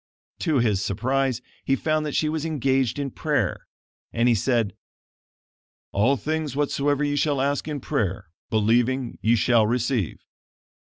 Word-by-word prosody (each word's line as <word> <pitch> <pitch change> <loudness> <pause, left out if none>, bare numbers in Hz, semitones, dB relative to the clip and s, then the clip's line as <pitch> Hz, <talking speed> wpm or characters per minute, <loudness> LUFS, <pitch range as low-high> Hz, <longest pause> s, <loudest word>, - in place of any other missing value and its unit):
To 160 -5 +1
his 110 -6 +2
surprise 130 +4 0 0.2
he 135 - +2
found 155 +2 0
that 145 - -4
she 155 - +2
was 155 -1 -2
engaged 135 -5 0
in 140 -2 -3
prayer, - - -1 0.4
and 115 +1 +1
he 120 - +5
said: 115 -1 +1 1.2
"All 120 +8 +2
things 155 -1 -2
whatsoever 145 0 +1
ye 145 0 0
shall 145 -1 +1
ask 140 +2 0
in 150 -2 -3
prayer, 95 -8 -2 0.2
believing, 120 +4 +1
ye 115 +2 +4
shall 115 0 +3
receive." 120 - 0
130 Hz, 145 wpm, -24 LUFS, 115-145 Hz, 1.2 s, he